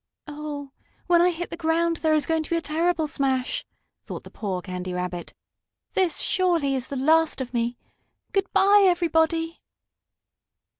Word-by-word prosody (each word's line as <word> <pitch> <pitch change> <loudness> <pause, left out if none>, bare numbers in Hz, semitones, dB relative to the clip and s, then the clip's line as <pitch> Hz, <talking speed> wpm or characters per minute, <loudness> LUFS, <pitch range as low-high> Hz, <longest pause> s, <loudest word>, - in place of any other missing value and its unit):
"Oh, 295 -2 -6 0.3
when 345 -1 +4
I 355 - +5
hit 350 0 -4
the - - -3
ground 335 0 +1
there 315 -1 +2
is 305 - +1
going 320 -1 +1
to 310 - -6
be 335 - +1
a 335 - 0
terrible 320 +1 0
smash!" 270 -4 -1 0.4
thought - - -7
the - - -13
poor 190 -4 -4
Candy 180 -1 -5
Rabbit. 180 -1 -4 0.6
"This, 370 -4 +1
surely, 340 -7 +2
is 260 -2 -2
the 280 - -5
last 315 +4 +3
of 255 -1 -5
me! 240 0 -1 0.5
Good 390 0 0
bye, 400 +1 +5
everybody!" 330 -2 +1
320 Hz, 160 wpm, -25 LUFS, 265-340 Hz, 0.6 s, I